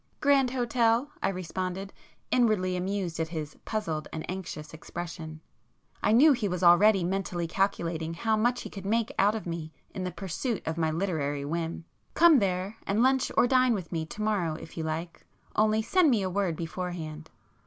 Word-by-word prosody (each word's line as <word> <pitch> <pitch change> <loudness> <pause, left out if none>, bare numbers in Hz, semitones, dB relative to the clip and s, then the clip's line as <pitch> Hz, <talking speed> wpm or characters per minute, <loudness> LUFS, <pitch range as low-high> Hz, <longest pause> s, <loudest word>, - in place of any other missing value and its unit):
"Grand 280 -3 +4
Hotel," 240 +1 +1
I - - +2
responded, 185 +1 -4 0.4
inwardly 215 -7 +2
amused 180 -2 -2
at 160 - 0
his 155 -2 -5
puzzled 165 -9 -2
and 160 - -5
anxious 170 -5 -6
expression—I 160 +3 -7
knew 275 +8 +7
he 235 -5 -1
was 180 -1 -3
already 190 +3 +6
mentally 180 -1 -2
calculating 165 -3 -1
how 220 +5 +1
much 240 +3 +1
he - - -7
could 195 - -8
make 225 +3 0
out 205 +3 +4
of 220 - -5
me 165 -2 -5 0.2
in 185 - -5
the 180 - -2
pursuit 195 +5 -3
of 160 - -2
my 160 -1 +1
literary 155 -5 -1
whim—"Come 170 - +2
there, 190 +1 -1
and 210 +4 +2
lunch 265 0 +2
or - - +6
dine 255 -1 +4
with 185 -5 -6
me 160 -2 -2
to 210 +6 -5
morrow 190 -7 0
if 160 - -10
you 160 - -3
like—only 175 +6 -2
send 355 +6 +4
me 225 -6 +2
a 185 - -2
word 190 -3 0
beforehand. 165 -2 -5
185 Hz, 170 wpm, -28 LUFS, 165-220 Hz, 0.4 s, knew